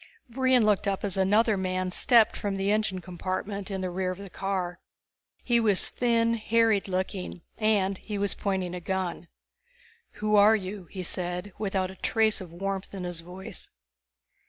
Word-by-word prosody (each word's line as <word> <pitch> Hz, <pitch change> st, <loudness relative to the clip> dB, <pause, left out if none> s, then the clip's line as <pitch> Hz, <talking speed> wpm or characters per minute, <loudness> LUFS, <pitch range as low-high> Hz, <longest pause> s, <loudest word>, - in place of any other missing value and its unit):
Brion 255 Hz, -1 st, +3 dB
looked 210 Hz, -2 st, +2 dB
up 195 Hz, -1 st, -1 dB
as 200 Hz, -3 st, -1 dB
another 205 Hz, +3 st, +3 dB
man 185 Hz, -1 st, -1 dB
stepped 230 Hz, +3 st, +4 dB
from 200 Hz, -1 st, -2 dB
the 195 Hz, +1 st, +1 dB
engine 210 Hz, -3 st, 0 dB
compartment 185 Hz, +3 st, -4 dB
in 190 Hz, -1 st, -3 dB
the 185 Hz, -1 st, -2 dB
rear 185 Hz, +1 st, -1 dB
of 185 Hz, -, -4 dB
the 200 Hz, -2 st, -9 dB
car. 185 Hz, -3 st, -2 dB, 0.6 s
He 240 Hz, -2 st, +3 dB
was 210 Hz, -4 st, +3 dB
thin, 230 Hz, -1 st, +2 dB
harried 225 Hz, -2 st, +2 dB
looking. 185 Hz, -2 st, -3 dB, 0.2 s
And 200 Hz, -3 st, +2 dB
he 210 Hz, -2 st, -5 dB
was 200 Hz, 0 st, +1 dB
pointing 190 Hz, -3 st, -2 dB
a 180 Hz, -, -4 dB
gun. 180 Hz, -2 st, -3 dB, 0.9 s
"Who 210 Hz, 0 st, 0 dB
are 210 Hz, +2 st, +7 dB
you?" 195 Hz, -2 st, -5 dB
he 185 Hz, +2 st, -7 dB
said, 180 Hz, +2 st, -2 dB
without 190 Hz, -3 st, -1 dB
a -, -, -12 dB
trace 220 Hz, +1 st, +1 dB
of 180 Hz, -3 st, -9 dB
warmth 195 Hz, +2 st, -4 dB
in 190 Hz, -, -5 dB
his 175 Hz, -2 st, -3 dB
voice. 180 Hz, +3 st, -8 dB
195 Hz, 170 wpm, -28 LUFS, 185-215 Hz, 0.9 s, are